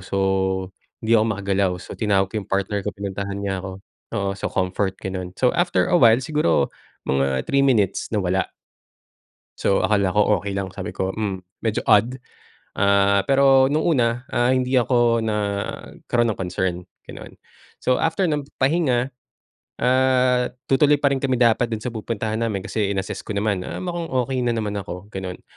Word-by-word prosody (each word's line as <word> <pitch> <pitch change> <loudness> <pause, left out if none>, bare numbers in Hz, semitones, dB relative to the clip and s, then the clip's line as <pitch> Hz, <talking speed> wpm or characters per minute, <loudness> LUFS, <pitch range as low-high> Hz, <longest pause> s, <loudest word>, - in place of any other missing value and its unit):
So, 100 - -3 0.8
hindi 110 - 0
ako 110 - +2
makagalaw, 100 -1 0
so - - -9
tinawag 100 -3 +2
ko - - -21
yung - - -16
partner 100 +1 0
ko, - - +1
pinuntahan 100 0 -4
niya 100 -1 -2
ko. 95 0 -8 0.3
Oo, 100 -1 -1
so - - -3
comfort, 95 +1 -1
gano'n. 90 -1 -5
So, 125 - +3
after 175 +1 +1
a 175 - +5
while 115 -2 +6
siguro, 150 - +1 0.4
mga 70 -1 +1
3 140 0 +2
minutes 115 -8 +2
nawala. 95 -2 0 1.1
So 95 - +2
akala 100 -3 +1
ko 105 -1 +3
okey 100 0 -5
lang 95 -1 -3
sabi 95 0 -7
ko 95 0 -1
"Hmm 100 -3 -3 0.2
medyo 110 -2 -1
odd" 110 +3 +4 0.6
ah, 100 0 +3
pero 135 -1 +5
nung 150 +3 +1
una 125 -7 +1
ah, 120 +1 +2
hindi 130 0 +2
ako 120 -1 +3
nagkaroon 105 +2 -2
ng 105 - -4
concern 90 -1 -2 0.2
ganon. - - -11 0.5
So 130 - +2
after 165 +4 0
ng 145 -2 -2
pahinga, 135 -3 +1 0.7
ah, 125 0 +3 0.2
tutuloy 145 +2 +5
pa 140 - +4
rin 135 - +1
kami 130 -1 0
dapat 120 -1 +3
dun 110 -2 -5
sa 125 - -3
pupuntahan 110 -1 -3
namin 110 -4 -1
kasi 105 +1 -1
in-assess 95 0 -4
ko 110 - -4
naman 100 -2 -1
ah, - - -5
mukhang 175 -2 -3
okey 130 -2 -1
na 120 - +1
naman 105 -2 -2
ako 95 0 -8
ganon 95 -2 -6
110 Hz, 170 wpm, -22 LUFS, 95-125 Hz, 1.1 s, while